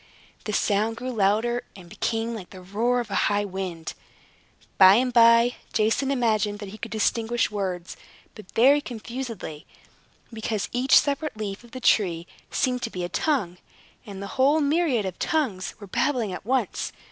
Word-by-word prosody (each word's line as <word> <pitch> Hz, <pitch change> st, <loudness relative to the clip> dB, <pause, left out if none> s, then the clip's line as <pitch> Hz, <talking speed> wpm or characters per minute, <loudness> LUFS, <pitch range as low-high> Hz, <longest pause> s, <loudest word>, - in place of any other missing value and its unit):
The 215 Hz, -, -2 dB
sound 210 Hz, +2 st, +1 dB
grew 255 Hz, +2 st, -4 dB
louder, 225 Hz, +3 st, +1 dB
and 185 Hz, -3 st, -12 dB
became 225 Hz, +5 st, -2 dB
like 205 Hz, -6 st, -8 dB
the 185 Hz, -, -11 dB
roar 230 Hz, +6 st, 0 dB
of 235 Hz, -, -9 dB
a -, -, +2 dB
high 205 Hz, 0 st, +1 dB
wind. 185 Hz, -4 st, -5 dB, 0.9 s
By 190 Hz, 0 st, +9 dB
and 250 Hz, +2 st, +1 dB
by, 230 Hz, +1 st, +6 dB, 0.2 s
Jason 225 Hz, +5 st, +1 dB
imagined 220 Hz, -6 st, +1 dB
that 205 Hz, -1 st, -8 dB
he 215 Hz, +2 st, -11 dB
could 235 Hz, -, -6 dB
distinguish 225 Hz, +2 st, 0 dB
words, 185 Hz, -4 st, -4 dB, 0.4 s
but 215 Hz, -4 st, -13 dB
very 275 Hz, +5 st, +5 dB
confusedly, 235 Hz, -, -7 dB, 0.7 s
because 220 Hz, -2 st, -3 dB
each 250 Hz, +2 st, +4 dB
separate 285 Hz, -2 st, 0 dB
leaf 205 Hz, 0 st, -5 dB
of 240 Hz, -, -16 dB
the 255 Hz, -, -8 dB
tree 175 Hz, -9 st, +2 dB, 0.2 s
seemed 250 Hz, -2 st, 0 dB
to 230 Hz, -, -2 dB
be 180 Hz, -4 st, -5 dB
a 175 Hz, -, -3 dB
tongue, 200 Hz, -, -1 dB, 0.4 s
and 200 Hz, -2 st, -8 dB
the 230 Hz, +6 st, -4 dB
whole 285 Hz, +4 st, +5 dB
myriad 290 Hz, -, +1 dB
of 185 Hz, -2 st, -5 dB
tongues 240 Hz, -13 st, -1 dB
were 205 Hz, -, -9 dB
babbling 225 Hz, 0 st, 0 dB
at 180 Hz, +3 st, -8 dB
once. 260 Hz, +1 st, -1 dB
225 Hz, 170 wpm, -25 LUFS, 195-245 Hz, 0.9 s, By